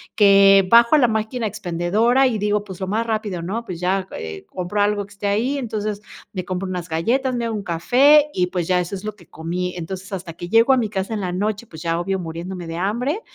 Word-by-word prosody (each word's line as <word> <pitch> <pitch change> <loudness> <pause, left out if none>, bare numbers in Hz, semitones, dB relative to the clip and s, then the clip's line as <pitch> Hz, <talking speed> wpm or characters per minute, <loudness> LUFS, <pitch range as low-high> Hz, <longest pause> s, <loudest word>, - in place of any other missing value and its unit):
que 195 -2 +6
bajo 235 +2 +6
a 305 - +7
la 245 - +5
máquina 220 +1 -2
expendedora 210 +6 +1
y 230 -4 -1
digo: 210 0 0
"Pues 190 -3 -10
lo 190 - -2
más 220 +4 -1
rápido", 215 -5 -2
¿no? 210 +7 -4
Pues 180 -6 -6
ya, 185 +1 0
eh, 80 -1 -7
compro 185 +3 -3
algo 205 0 +1
que 205 - -22
esté 205 +1 -8
ahí, 230 +8 +1
entonces 215 -5 -3 0.3
me 185 -3 -5
compro 185 +1 -3
unas 180 -1 -5
galletas, 250 +12 0
me 235 -1 -2
hago 225 -1 -2
un 205 - -4
café 265 - +4
y 180 - +2
pues 180 -2 -3
ya 180 -1 +2
eso 175 +2 -4
es 190 - -5
lo 215 -1 -5
que 175 -5 -18
comí 180 +3 -4
entonces, 175 +2 -5 0.2
hasta 180 -3 -5
que 175 +1 -8
llego 230 +5 +5
a - - +3
mi 225 -4 0
casa 195 +1 -3
en 210 - -2
la 180 -2 -2
noche, 210 +5 -2
pues 160 -6 -11
ya 165 0 -1
obvio 190 +2 -2
muriéndome 170 +1 -6
de 165 - -5
hambre, 240 - -1
200 Hz, 245 wpm, -21 LUFS, 180-225 Hz, 0.3 s, a